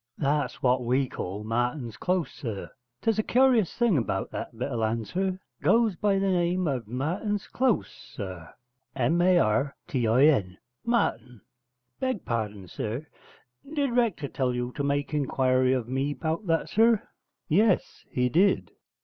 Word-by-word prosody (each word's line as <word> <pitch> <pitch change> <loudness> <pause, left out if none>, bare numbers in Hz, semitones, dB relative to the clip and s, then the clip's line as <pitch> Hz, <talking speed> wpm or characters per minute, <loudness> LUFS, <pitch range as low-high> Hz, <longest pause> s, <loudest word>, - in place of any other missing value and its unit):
'That's 145 -2 -1
what 125 0 +3
we 130 +3 +1
call 100 -2 -5
Martin's 120 +1 -2
Close, 180 - -1
sir: 110 -7 -6 0.3
'tes 225 -1 +2
a - - +5
curious 245 -4 +3
thing 225 - +3
'bout 95 -4 -3
that 115 - -6
bit 130 +4 -3
of 120 - -2
land, 110 0 -1
sir: 185 - -1 0.2
goes 230 -4 +3
by 200 +2 +1
the 195 0 +1
name 175 0 +1
of 130 -7 -2
Martin's 175 - -2
Close, 255 -4 +1
sir. 95 -6 -9 0.4
M 150 +7 +2
a 180 0 +5
r 135 +1 +2
t 125 -5 0
i 120 +5 +4
n 100 -12 +2 0.3
Martin. 125 - -1 0.6
Beg 260 -6 -2
pardon, 105 -5 -3
sir, 115 - -4 0.7
did 280 -3 +1
Rector 220 -12 +1
tell 130 -2 -1
you 125 0 -2
to 145 - -2
make 140 +1 -1
inquiry 130 -3 +2
of 125 -3 0
me 135 +3 -1
'bout 165 +5 -3
that, 165 -1 +1
sir?' 225 0 +3 0.4
'Yes, 200 +4 +2
he 125 0 +1
did.' 180 +10 +2
140 Hz, 160 wpm, -27 LUFS, 120-190 Hz, 0.7 s, a